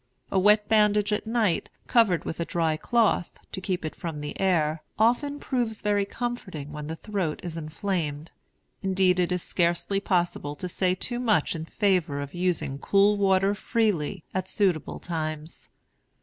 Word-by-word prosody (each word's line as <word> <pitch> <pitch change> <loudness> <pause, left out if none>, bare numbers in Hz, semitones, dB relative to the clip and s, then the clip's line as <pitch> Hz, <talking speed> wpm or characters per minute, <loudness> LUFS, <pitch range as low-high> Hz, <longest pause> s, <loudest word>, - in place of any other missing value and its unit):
A 190 - +3
wet 210 +2 +4
bandage 210 -1 +3
at 210 - -2
night, 220 -6 +1 0.2
covered 205 - +3
with 165 - -4
a - - +1
dry 165 -2 0
cloth, 215 +1 +1
to 190 - -5
keep 185 -3 -2
it 155 - -4
from 165 -3 -5
the 145 0 -6
air, 160 -5 +2 0.2
often 285 +6 +2
proves 240 -6 -2
very 205 -1 +2
comforting 200 - -5
when 150 0 -6
the 160 - -4
throat 185 -4 -3
is 170 -2 -5
inflamed. 160 -1 -3 0.5
Indeed, 190 -1 +2
it 180 0 +1
is 180 -1 -1
scarcely 175 +3 +1
possible 175 -7 0
to 180 - -4
say 180 +1 +1
too 240 +6 -3
much 215 -12 +2
in 160 -1 -4
favor 180 -7 +1
of 140 -1 -6
using 175 -6 -1
cool 200 +4 +4
water 195 0 +3
freely, 200 -7 0
at 185 0 -2
suitable 185 -7 0
times. 155 -2 -5
185 Hz, 165 wpm, -26 LUFS, 160-210 Hz, 0.5 s, wet